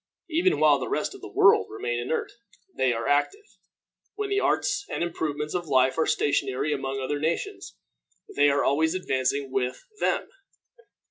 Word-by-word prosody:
Even 345 +4 +2
while 150 -2 +5
the 130 - -4
rest - - -1
of - - -12
the - - -9
world 95 - +5
remain 120 +2 -3
inert, 125 +6 -2 0.4
they 130 -1 +2
are 115 -1 -2
active. 270 - +1 0.7
When 410 -1 -3
the 400 - +2
arts 410 0 +1
and - - -2
improvements 150 -3 -3
of 175 -2 -3
life 130 -2 +3
are 160 - +2
stationary 145 +1 0
among 135 -1 -3
other 140 +2 -2
nations, 170 - -3 0.6
they 145 0 +5
are 140 0 +2
always 160 +5 +2
advancing 135 -5 -1
with 130 - -2
them. - - 0
145 Hz, 160 wpm, -26 LUFS, 130-170 Hz, 0.7 s, while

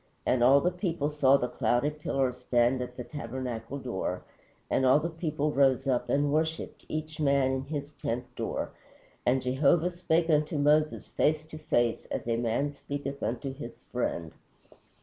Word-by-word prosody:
And 125 -2 +2
all 135 +3 +7
the 180 - +2
people 170 -5 -1
saw 140 -2 +5
the 125 - -1
cloudy 125 +4 +1
pillar 135 -4 -1
stand 125 0 +1
at 125 0 -6
the 125 - -4
tabernacle 125 -2 -5
door, 115 -8 -3 0.4
and - - +1
all 130 +3 +6
the 170 +3 -3
people 155 -2 -1
rose 135 -1 +3
up 125 -2 +1
and 145 0 +2
worshiped, 160 +1 -2
each 155 0 -4
man 140 -3 +3
in 130 0 -1
his 145 0 -4
tent 125 -3 -3
door. - - -3 0.6
_And 130 +1 +3
Jehovah 145 +7 +3
spake 170 -1 +1
unto 150 -1 +2
Moses, 150 +1 +3
face 155 0 +1
to 155 - -8
face, 120 -6 +1
as - - -4
a 115 - +2
man 120 +5 0
speaketh 140 -1 -5
unto 125 +3 -2
his 125 -4 -8
friend. 85 -9 -2
140 Hz, 170 wpm, -29 LUFS, 125-150 Hz, 0.6 s, all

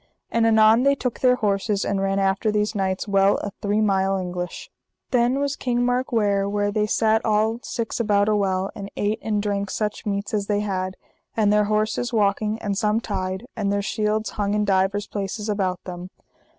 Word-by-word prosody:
And 230 -1 +3
anon 220 +1 +5
they 280 +1 +4
took 250 -3 -3
their 250 -1 +4
horses 205 -2 0
and 195 -1 -1
ran 195 0 0
after 195 +2 +1
these 210 +1 0
knights 190 -1 -1
well 195 0 +3
a 205 - -4
three 205 +1 +1
mile 195 -2 +2
English. 180 -1 -5 0.4
Then 245 +1 +2
was 285 0 -1
King 245 -1 0
Mark 250 +1 0
ware 200 -3 +1
where 205 0 0
they 210 0 0
sat 220 +1 +2
all 220 +1 +1
six 230 -1 -4
about 205 -3 +2
a 215 - +3
well, 190 -1 0
and 200 0 -7
ate 210 +2 0
and 210 -2 -1
drank 200 -1 -1
such 210 +1 -3
meats 200 +1 -2
as 205 -2 -1
they 205 -1 +1
had, 185 -2 -3 0.4
and 210 -2 +3
their 210 0 +3
horses 215 +3 0
walking 210 0 +1
and 200 -2 -1
some 210 +2 +1
tied, 190 -1 -4
and 205 -3 -1
their 200 0 0
shields 215 +1 -1
hung 205 0 -1
in 210 0 +1
divers 195 +1 +1
places 205 +1 -4
about 190 -4 -1
them. 180 0 -7
205 Hz, 195 wpm, -23 LUFS, 195-220 Hz, 0.4 s, anon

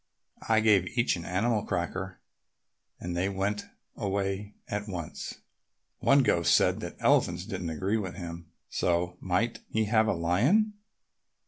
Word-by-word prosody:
I 110 -1 +5
gave 105 0 +3
each 120 -4 +3
an 85 -1 -7
animal 105 +5 +1
cracker 90 +1 -3 0.8
and 90 0 -4
they 90 +3 +1
went 100 +2 -2 0.3
away 100 +1 -2
at 105 +1 -3
once. 85 -6 -5 0.6
One 140 0 +5
ghost 85 -8 +4
said - - +3
that - - -6
elephants 90 +1 +2
didn't 95 -5 -4
agree 95 +7 0
with 95 -4 -4
him, 85 -2 -7 0.2
so 90 0 0
might 100 +6 0
he 110 0 +1
have 110 +1 +3
a - - +2
lion." 125 - +3
95 Hz, 140 wpm, -29 LUFS, 90-110 Hz, 0.8 s, I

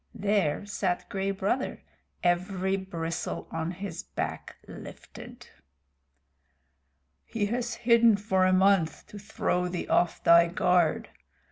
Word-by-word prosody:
There 200 -4 0
sat 190 -3 -2
Gray 195 0 -2
Brother, 195 +7 -2 0.4
every 185 +2 0
bristle 170 -4 -4
on 160 0 -3
his 180 -1 -6
back - - -5
lifted. - - -11 1.8
"He 215 -3 -2
has 240 +3 -2
hidden 235 -2 +4
for 190 -2 +1
a - - +3
month 185 -3 +2
to 205 - -9
throw 180 -2 -1
thee 175 0 -4
off 175 -2 +1
thy 170 0 +6
guard. 180 -1 +1
190 Hz, 115 wpm, -27 LUFS, 175-205 Hz, 1.8 s, thy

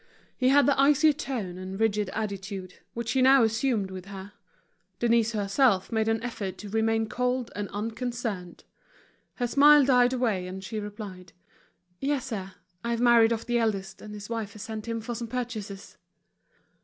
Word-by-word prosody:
He 255 -1 +2
had 280 +1 +5
the 280 -1 +2
icy 295 +2 +5
tone 225 -11 -4
and 190 +1 -6
rigid 210 -3 +1
attitude, 195 -3 -5 0.2
which 230 -1 -3
he 260 - +2
now 265 0 +6
assumed 220 -3 0
with 185 -1 -8
her. 195 0 -9 0.6
Denise 230 -1 +2
herself 205 0 +2
made 220 -1 +1
an 225 0 0
effort 205 -6 -4
to 210 - -8
remain 225 +1 +1
cold 250 +1 -1
and 205 -1 -4
unconcerned. 225 -3 -4 0.7
Her 245 - -1
smile 290 +3 +6
died 250 -2 +4
away, 220 -8 0
and 190 +1 -7
she 215 +3 -4
replied: 205 -4 -8 0.7
"Yes, 275 -2 -1
sir. 195 -4 -5 0.3
I've 235 0 -1
married 235 -2 +5
off 230 -1 -2
the 240 0 +1
eldest, 195 -4 -2
and 210 0 -9
his 205 0 -8
wife 225 -3 -4
has 210 - -8
sent 220 0 -6
him 230 -1 -2
for 240 +2 -5
some 235 0 -5
purchases." 220 -5 -6
225 Hz, 170 wpm, -27 LUFS, 200-245 Hz, 0.7 s, now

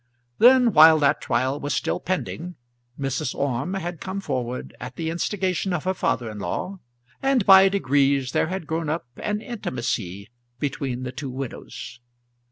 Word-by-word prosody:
Then, 245 -1 +6
while 160 0 +8
that 145 -2 +2
trial 130 +4 0
was 145 0 -2
still - - -1
pending, 180 -1 -3 0.4
Mrs. 135 -2 -2
Orme 140 +6 -1
had 175 -3 -5
come 190 +1 -4
forward 125 -8 -4
at 125 0 -7
the 160 -1 -3
instigation 185 +1 -1
of 170 - -2
her 185 - 0
father 125 -9 -1
in 105 - -8
law, 185 - -4 0.4
and 270 -6 +2
by 195 0 +8
degrees 140 -7 +2
there - - +1
had 185 -1 -4
grown 160 0 -2
up 155 -2 -2
an 210 0 -2
intimacy 120 - -4 0.3
between 130 -2 -3
the 125 - -4
two 135 +1 -6
widows. 130 -2 -7
150 Hz, 160 wpm, -24 LUFS, 130-190 Hz, 0.4 s, while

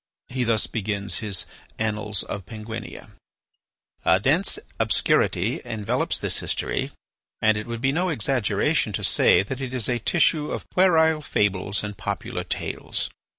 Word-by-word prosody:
He 125 0 -1
thus 115 -2 +2
begins 100 -2 -2
his 100 -5 -1 0.3
"Annals 105 -2 -1
of 100 -3 -6
Penguinia": 110 0 -7 0.9
"A 95 - +4
dense 155 - +2 0.2
obscurity - - +2
envelopes 105 -2 -1
this - - 0
history, - - -1 0.5
and 110 -1 +4
it 105 +1 -4
would 115 -1 -4
be 135 +1 +3
no 180 +5 +1
exaggeration 125 - +1
to - - -2
say - - +5
that 130 +7 -5
it 130 -1 -4
is 120 -4 +1
a 120 -1 0
tissue 155 +3 +2
of - - -4
puerile 160 -4 +4
fables 100 -6 0
and 105 -1 -4
popular - - -3
tales. - - -3
110 Hz, 145 wpm, -24 LUFS, 105-135 Hz, 0.9 s, say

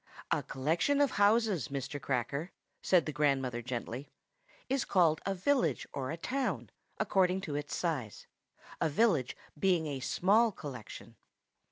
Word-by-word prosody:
"A - - +2
collection 165 - 0
of 285 -1 +3
houses, 205 - +3
Mr. 140 +1 -4
Cracker," 140 +6 -2 0.3
said 180 -3 +3
the 155 - -2
grandmother 135 -4 +1
gently, 125 +2 -5 0.6
"is 270 -1 +1
called 165 -5 +3
a 195 - 0
village 260 +8 +1
or 130 -2 -3
a 160 - -3
town, 180 - -2 0.3
according 190 -3 +2
to 155 - -5
its 145 0 -3
size; 140 - -3 0.6
a - - +3
village 160 - +2 0.2
being 175 -2 +2
a 140 -3 -3
small 210 - +3
collection." 130 - -9
160 Hz, 140 wpm, -32 LUFS, 135-195 Hz, 0.6 s, of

